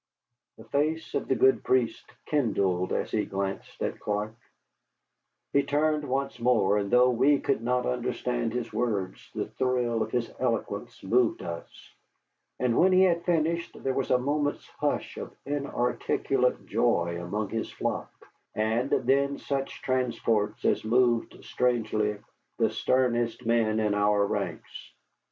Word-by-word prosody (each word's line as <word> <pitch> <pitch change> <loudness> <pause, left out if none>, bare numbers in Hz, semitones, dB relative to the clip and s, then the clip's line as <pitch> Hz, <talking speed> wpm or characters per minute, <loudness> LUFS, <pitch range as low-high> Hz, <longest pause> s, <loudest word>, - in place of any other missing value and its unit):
The 110 - -12
face 150 +7 -1
of - - -1
the 130 - +2
good 130 +2 +4
priest 125 -3 0
kindled 100 -10 +1
as - - -1
he 105 - +1
glanced 95 0 -4
at - - -3
Clark. 105 +1 -2 1.2
He 140 - +5
turned 150 +1 0
once 135 -1 -2
more, 110 -4 +3
and 100 -1 -2
though 125 +2 +5
we 135 +4 +4
could - - 0
not 125 +1 0
understand 125 -1 -1
his 120 -1 -4
words, 105 -6 -2
the - - -1
thrill 125 -3 0
of - - -1
his 120 -1 -2
eloquence - - -2
moved 120 +4 +2
us. 85 0 -8 0.6
And 125 -2 +1
when 185 +1 +5
he 185 +1 +6
had 170 -2 +2
finished 170 0 0
there 135 - 0
was 135 0 -1
a 125 - +5
moment's 145 +3 -1
hush - - -1
of - - -7
inarticulate 140 -4 0
joy 85 0 +1
among 105 +3 -3
his 115 -1 -3
flock, - - -3 0.5
and 110 +5 0
then 140 +1 +2
such 135 -1 -4
transports 115 -4 0
as - - +2
moved 120 +1 +1
strangely 110 -4 0 0.4
the 115 -2 +2
sternest 120 0 0
men 110 -1 +2
in 105 -1 +1
our 105 0 +3
ranks. - - -5
120 Hz, 140 wpm, -28 LUFS, 110-135 Hz, 1.2 s, he